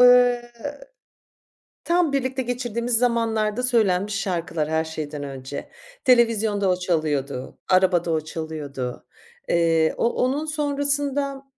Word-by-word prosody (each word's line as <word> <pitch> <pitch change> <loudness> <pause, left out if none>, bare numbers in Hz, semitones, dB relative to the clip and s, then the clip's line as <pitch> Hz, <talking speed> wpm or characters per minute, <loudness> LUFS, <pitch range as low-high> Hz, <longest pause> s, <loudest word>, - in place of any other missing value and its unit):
ııı, 245 -1 +6 1.4
tam 340 -4 +2
birlikte 260 -1 0
geçirdiğimiz 240 -1 -1
zamanlarda 230 -1 +1
söylenmiş 210 -5 +2
şarkılar 170 -5 -2
her 160 0 +1
şeyden 155 -2 -5
önce. 135 0 -7 0.4
Televizyonda 225 -5 +3
o 180 - +3
çalıyordu, 150 -7 -2
arabada 185 -2 +3
o 160 -1 +1
çalıyordu. 150 -5 -5 0.4
Eee, 165 -2 +3
o - - +1
onun 275 +6 0
sonrasında, 285 -2 -1
210 Hz, 105 wpm, -23 LUFS, 160-250 Hz, 1.4 s, ııı